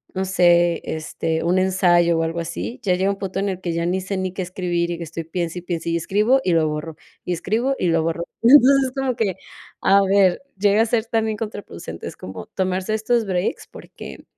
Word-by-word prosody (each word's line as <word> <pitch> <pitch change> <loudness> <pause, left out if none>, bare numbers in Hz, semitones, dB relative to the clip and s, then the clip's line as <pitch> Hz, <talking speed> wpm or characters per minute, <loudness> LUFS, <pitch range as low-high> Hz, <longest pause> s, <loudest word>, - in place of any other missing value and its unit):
no 190 - 0
sé, 175 -2 +3
este, 160 +1 -3
un 180 +2 +2
ensayo 175 -3 +3
o 165 - +1
algo 165 +1 -2
así, 115 - -5
ya 180 -2 +2
llega 190 +2 +1
un 200 - -5
punto 195 0 -3
en 200 0 0
el 185 -1 -4
que 170 -2 -2
ya 170 0 -1
ni 185 +2 0
sé 195 +1 -4
ni 185 -1 -2
qué 190 - -4
escribir, 175 -1 -2
y 170 0 -5
estoy 165 +1 -6
piense, 170 +1 -3
y - - -11
piense, 170 -2 -3
y 165 - +1
escribo, 210 +10 +2
y 180 - +1
lo 160 -1 +3
borro, 150 +1 -5 0.3
y 180 - -1
escribo, 225 +10 -1
y 180 - +1
lo 165 0 +2
borro. 165 +1 -2 0.2
Entonces, 270 +1 +6
como 265 -2 -1
que, 200 -6 0 0.5
a 200 +1 +5
ver, 195 +3 +3
llega 205 +2 +3
a - - 0
ser 225 0 0
también 220 -2 0
contraproducente, 200 - -7
es - - -8
como 95 -2 -8
tomarse 185 +2 -2
estos 225 +1 +1
breaks, 185 -1 -2
porque - - -11
185 Hz, 215 wpm, -21 LUFS, 170-205 Hz, 0.5 s, Entonces